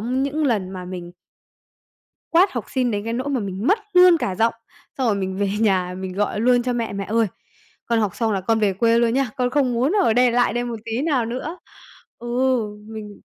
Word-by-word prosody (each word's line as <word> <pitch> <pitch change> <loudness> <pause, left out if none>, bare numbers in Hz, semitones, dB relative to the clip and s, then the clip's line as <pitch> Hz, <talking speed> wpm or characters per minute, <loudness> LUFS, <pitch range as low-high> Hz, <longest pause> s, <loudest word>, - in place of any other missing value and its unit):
những 270 +6 -1
lần 205 -8 0
mà 185 -1 -7
mình 175 -1 -7 1.2
quát 360 +4 +4
học 240 -4 -3
sinh 255 -2 0
đến 205 -1 -2
cái 230 - -3
nỗi 255 +4 -2
mà 265 -3 0
mình 195 +2 -4
mất 410 +7 +4
luôn 360 -1 +7
cả 190 -10 -2
giọng, 225 +4 +1 0.4
xong 260 - +1
rồi 210 - +2
mình 190 -1 -3
về 200 0 0
nhà 185 -4 +1
mình 190 -1 -5
gọi 205 +2 -1
luôn 245 +1 +3
cho 250 - -1
mẹ: 235 -3 -2
"Mẹ 200 0 -4
ơi, 225 +2 +1 0.6
con 230 -1 +1
học 205 -4 -1
xong 225 -2 0
là 195 - 0
con 225 +4 +1
về 205 -2 +2
quê 230 +4 +2
luôn 235 0 +2
nhá, 270 -3 +1
con 250 -2 0
không 265 -2 +1
muốn 255 +8 +1
ở 225 - +3
đây 245 +1 +4
lại 245 0 +2
đây 240 +1 -1
một 240 -1 -4
tí 230 +3 -2
nào 285 -7 +1
nữa." 260 +9 -5 0.6
Ừ, 240 - -9 0.6
mình 215 -2 -9
230 Hz, 225 wpm, -22 LUFS, 205-255 Hz, 1.2 s, luôn